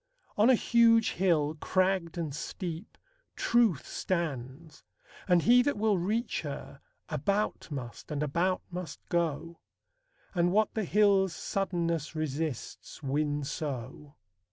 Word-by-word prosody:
On 215 +4 +5
a 260 - +7
huge 230 -1 +4
hill, 160 -5 +1
Cragged 185 -3 +1
and 155 -5 -3
steep, 175 +3 -6 0.4
Truth 230 - +2
stands, 150 -3 -4 0.4
and 180 -2 +4
he 245 +2 +6
that 285 -2 0
will 210 -2 +2
Reach 215 +7 -1
her, - - -7 0.3
about 205 +1 -1
must 130 -6 -7
and 150 -1 -2
about 170 +6 0
must 175 -4 -6
go; 165 -1 -1 0.7
And 175 -1 +2
what 215 +3 +2
the 220 -2 -1
hill's 195 -2 +3
suddenness 170 -6 -2
resists 155 -1 -4
win 145 +1 0
so. 140 0 -5
170 Hz, 120 wpm, -30 LUFS, 150-200 Hz, 0.7 s, a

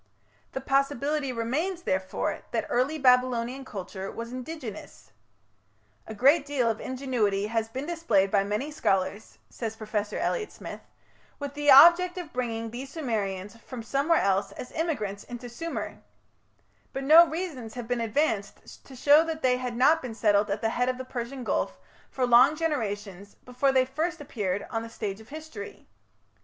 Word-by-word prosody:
The 265 - -3
possibility 275 +1 0
remains, 300 +11 -2
therefore, 190 - -1
that - - -1
early 260 +6 +1
Babylonian 250 -1 +2
culture 195 -4 -6
was 230 +1 -7
indigenous. 255 -4 -8 1.0
"A 220 - -7
great 275 +8 +5
deal 270 -5 +1
of 220 - -6
ingenuity 245 -7 -1
has 225 +1 -1
been 265 +5 -5
displayed 235 - +1
by 200 -2 +3
many 210 +9 -2
scholars", 200 -6 -1
says 225 -2 -5
Professor 215 -1 -3
Elliot 440 -4 -1
Smith, - - -9 0.6
"with 285 -1 -5
the 290 0 0
object 345 +6 +8
of 350 -4 -7
bringing 230 -3 -3
these 260 +3 -6
Sumerians 210 - -3
from 235 0 -9
somewhere 280 +7 +2
else 195 0 +1
as 250 - -8
immigrants 220 - -2
into 245 0 -8
Sumer; 330 +8 -5 0.9
but 270 - -3
no 320 +5 +8
reasons 305 -10 -5
have 245 -2 -6
been 245 -1 -1
advanced 225 -3 -2
to 265 - -13
show 290 +5 +6
that 320 -1 -4
they 250 -1 +3
had 250 -2 -4
not 310 +6 +5
been 245 -4 -6
settled 205 -2 +3
at 200 +1 -2
the 225 - +1
head 245 +2 0
of 255 - -2
the 260 - -6
Persian 250 +1 -5
Gulf - - -1 0.3
for 255 - 0
long 245 +5 +6
generations 205 - -3
before 250 +2 +1
they 260 -1 +3
first 325 +6 -2
appeared 205 -9 -3
on 225 -2 -1
the 230 - -7
stage 210 -2 -5
of 220 - -17
history. 315 +9 -9
250 Hz, 165 wpm, -27 LUFS, 220-290 Hz, 1.0 s, object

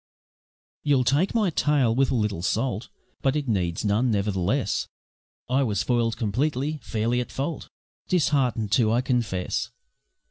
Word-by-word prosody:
You'll 140 -3 +3
take 150 - +1
my 210 -6 +2
tale 145 -7 +2
with 135 +2 +2
a - - +1
little 105 -6 -1
salt, 110 +3 -1 0.3
But 135 +1 +1
it 150 -2 -2
needs 90 -5 -1
none, 110 +5 +2
nevertheless, 100 -4 0 0.6
I 130 +2 +2
was 110 -6 0
foil'd 115 -2 +1
completely, 140 +7 -1
fairly 115 +3 0
at 125 - -7
fault, 145 +4 -4 0.4
Dishearten'd, 135 - +1
too, 110 +1 +3
I 120 +2 +3
confess. 115 -8 -1
120 Hz, 140 wpm, -25 LUFS, 105-140 Hz, 0.6 s, You'll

